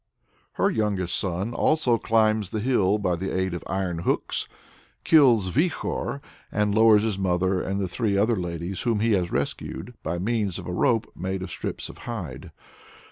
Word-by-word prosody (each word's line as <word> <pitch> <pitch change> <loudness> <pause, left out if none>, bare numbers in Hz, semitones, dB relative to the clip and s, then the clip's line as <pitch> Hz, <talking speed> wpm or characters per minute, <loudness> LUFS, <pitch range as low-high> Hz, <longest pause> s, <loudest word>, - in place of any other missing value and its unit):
Her - - +2
youngest 100 -5 0
son 95 +5 -2 0.5
climbs 110 -3 +2
the 110 - -3
hill 105 -4 +2
by 95 -4 0
the 95 +3 -3
aid 95 -1 0
of 85 - -5
iron 90 -2 -2
hooks, 85 - -1 0.6
kills 120 - +5
Vikhor, 145 -2 -1 0.3
and 105 -1 +1
lowers 110 -1 +6
his 105 -3 -1
mother 95 0 +1
and 100 0 -2
three 100 +2 0
other 110 +4 +3
ladies 85 0 -4
whom 115 -4 +1
he 115 +2 +2
has 90 -4 +1
rescued, 70 +11 -3
by 85 +2 -2
means 105 -1 -1
of - - -7
a 90 - -4
rope 115 +3 +1
made 95 +1 -3
of - - -7
strips - - -4
of - - -12
hide. 85 - -6
100 Hz, 165 wpm, -25 LUFS, 90-110 Hz, 0.6 s, lowers